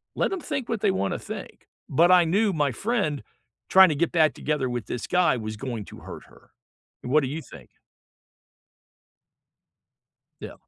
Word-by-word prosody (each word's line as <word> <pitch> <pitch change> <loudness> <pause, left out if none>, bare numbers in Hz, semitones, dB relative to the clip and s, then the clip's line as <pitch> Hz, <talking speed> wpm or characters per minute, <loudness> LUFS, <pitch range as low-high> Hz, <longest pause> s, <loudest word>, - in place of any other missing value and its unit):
let - - 0
'em 380 - -3
think 270 -4 -4
what 225 -3 -2
they - - +3
wanna 95 +1 -2
think, - - -9 0.2
but 170 +6 +4
I 180 -1 +7
knew 200 +5 +2
my 145 -4 +1
friend 195 - -2 0.5
trying 190 -2 +7
to 150 - -1
get 170 +3 0
back 155 -3 +3
together 150 -3 -2
with 120 -4 -4
this 125 - -4
guy 180 -7 +2
was 110 -1 -6
going 120 -6 -5
to - - -12
hurt - - -10
her. - - -21 0.5
What 150 +5 +2
do 135 - -2
you 150 +5 -5
think? 70 - -14 2.7
Yeah. - - -7
155 Hz, 170 wpm, -25 LUFS, 125-180 Hz, 2.7 s, I